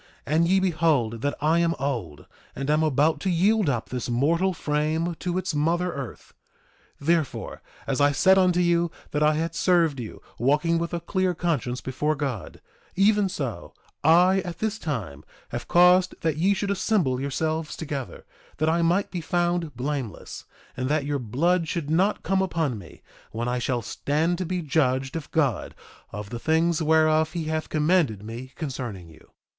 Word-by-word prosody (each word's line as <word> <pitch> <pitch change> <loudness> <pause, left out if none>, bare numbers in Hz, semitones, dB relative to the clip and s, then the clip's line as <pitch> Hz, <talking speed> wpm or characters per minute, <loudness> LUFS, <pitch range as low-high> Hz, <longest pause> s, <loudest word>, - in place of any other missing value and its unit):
And 160 +3 +2
ye 190 +2 +4
behold 155 -11 +1
that 145 +1 -1
I 160 +3 +3
am 170 0 +1
old, 120 - -4 0.3
and 135 +2 -2
am 155 +1 +3
about 155 +1 +2
to 195 - -1
yield 195 +1 +3
up 120 -4 -2
this 125 -1 -4
mortal 165 +10 +2
frame 155 +1 -1
to 180 0 -2
its 185 -2 -2
mother 170 +4 0
earth. 135 -4 -8 0.7
2:27 140 - -12
Therefore, 165 -3 -1 0.2
as 135 +1 -1
I 145 0 +5
said 190 +7 +5
unto 180 -2 +3
you 170 -1 +2 0.2
that 150 - -1
I 150 0 +4
had 165 +1 -2
served 165 -4 +2
you, 115 -3 -7 0.2
walking 150 +7 +2
with 170 0 -3
a - - -2
clear 185 +1 0
conscience 150 -8 -1
before 150 +4 -1
God, 135 -8 -5 0.3
even 200 +1 +3
so 135 - -5 0.3
I 180 +5 +5
at 175 -2 -5
this 220 0 -2
time 100 - -4 0.3
have - - -5
caused 180 +1 +5
that 160 -3 0
ye 190 +6 +2
should 200 +1 -2
assemble 185 - +1
yourselves 155 +3 -2
together, 140 -5 -6 0.3
that 155 +2 +1
I 170 +1 +2
might 175 +4 +1
be 180 - -3
found 175 -3 -1
blameless, 130 -3 -5 0.3
and 130 +1 -2
that 150 -1 +1
your 145 -1 -1
blood 160 +9 +1
should 155 -3 -3
not 190 +6 +2
come 190 0 +1
upon 160 - -1
me, 85 -5 -14 0.3
when 115 +2 -3
I 125 0 0
shall 120 -1 -1
stand 160 - -1
to 185 - -2
be 180 0 -2
judged 135 -3 0
of 160 -3 -5
God 140 -9 0 0.4
of 105 -1 -7
the 120 - -4
things 165 +3 +1
whereof 155 0 +3
he 170 -2 -2
hath 155 0 -3
commanded 150 - +1
me 120 +4 -8
concerning 125 - -5
you. 80 -1 -18
155 Hz, 175 wpm, -25 LUFS, 135-175 Hz, 0.7 s, I